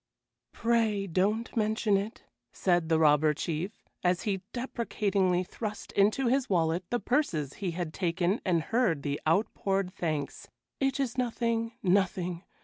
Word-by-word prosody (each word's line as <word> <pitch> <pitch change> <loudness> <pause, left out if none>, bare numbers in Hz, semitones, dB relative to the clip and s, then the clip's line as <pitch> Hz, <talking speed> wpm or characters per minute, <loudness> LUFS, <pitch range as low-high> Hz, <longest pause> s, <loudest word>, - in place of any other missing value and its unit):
"Pray 225 -4 +1
don't 200 +6 0
mention 215 -1 +2
it!" 200 +4 -3 0.3
said 175 -3 +1
the 160 - +4
Robber 150 -1 +4
Chief, 170 +7 -4 0.2
as 180 -1 +2
he 195 -3 -1
deprecatingly 200 -7 0
thrust 210 +2 -6
into 210 +7 +3
his 260 +2 +2
wallet 170 -1 +1
the 240 - 0
purses 180 - 0
he 190 - 0
had 170 -2 -4
taken 180 +3 0
and 170 -4 +1
heard 190 - +1
the 145 0 -2
outpoured 195 +1 +1
thanks. 155 -7 -3 0.3
"It 270 0 +1
is 255 -2 -1
nothing, 230 -1 0
nothing! 180 -2 +1
195 Hz, 140 wpm, -29 LUFS, 170-225 Hz, 0.3 s, the